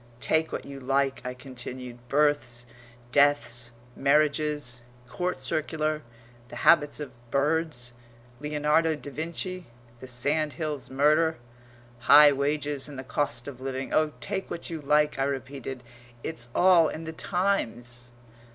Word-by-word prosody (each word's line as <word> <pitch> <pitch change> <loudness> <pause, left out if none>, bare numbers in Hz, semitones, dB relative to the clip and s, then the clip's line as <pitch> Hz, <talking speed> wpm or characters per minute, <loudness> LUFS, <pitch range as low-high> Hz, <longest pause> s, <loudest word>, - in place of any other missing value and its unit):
"Take 160 +4 +1
what - - -4
you 140 -1 -8
like," 135 +1 0
I 125 0 -5
continued, 125 -1 -8
"births, 140 -4 +1 0.5
deaths, 120 -4 +3 0.3
marriages, 145 -2 +1 0.3
Court 180 +2 -2
Circular, 155 +3 -1 0.5
the - - -10
habits 150 -3 +5
of 145 -3 -6 0.2
birds, 140 -3 0 0.5
Leonardo 150 +2 +1
da 145 -1 -9
Vinci, 170 +4 -4 0.3
the 130 - -9
Sandhills 145 +2 0
murder, 155 +4 +3 0.6
high 145 +4 +8
wages 145 0 -1
and 140 - -9
the 130 - -5
cost 130 -2 -2
of 130 -3 -8
living 135 0 -4
oh, 155 -1 +2
take 195 -1 -3
what 170 - -6
you 160 -2 -4
like," 150 0 +2
I - - +3
repeated, 135 -1 -4 0.4
"it's 160 -7 -4
all 175 -3 +6
in 155 - -5
the 160 0 -6
Times!" 120 - -1
145 Hz, 130 wpm, -27 LUFS, 130-155 Hz, 0.6 s, high